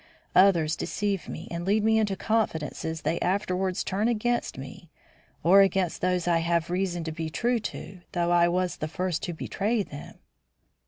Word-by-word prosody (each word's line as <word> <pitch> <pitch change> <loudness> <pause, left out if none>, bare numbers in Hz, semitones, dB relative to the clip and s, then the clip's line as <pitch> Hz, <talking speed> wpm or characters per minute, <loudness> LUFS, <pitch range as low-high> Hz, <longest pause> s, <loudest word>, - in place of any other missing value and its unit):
Others 170 -5 +5
deceive 200 -5 -2
me, - - -7
and 170 0 -3
lead 205 +3 +2
me 220 0 +4
into 205 -3 0
confidences 160 -7 -2
they 170 - 0
afterwards 185 0 0
turn 200 +4 0
against 240 - 0
me 135 +5 -9 0.5
or 190 +4 +7
against 190 -3 +1
those 180 -1 0
I 170 -1 +3
have 170 0 0
reason 180 -2 -1
to 160 - -4
be 160 0 -4
true 240 +8 0
to, 190 -3 -7
though 175 -1 +1
I 175 0 +5
was 180 +1 0
the 155 - -3
first 180 +1 -2
to 175 - -3
betray 205 +6 -1
them." 145 -5 -10
180 Hz, 170 wpm, -27 LUFS, 170-200 Hz, 0.5 s, or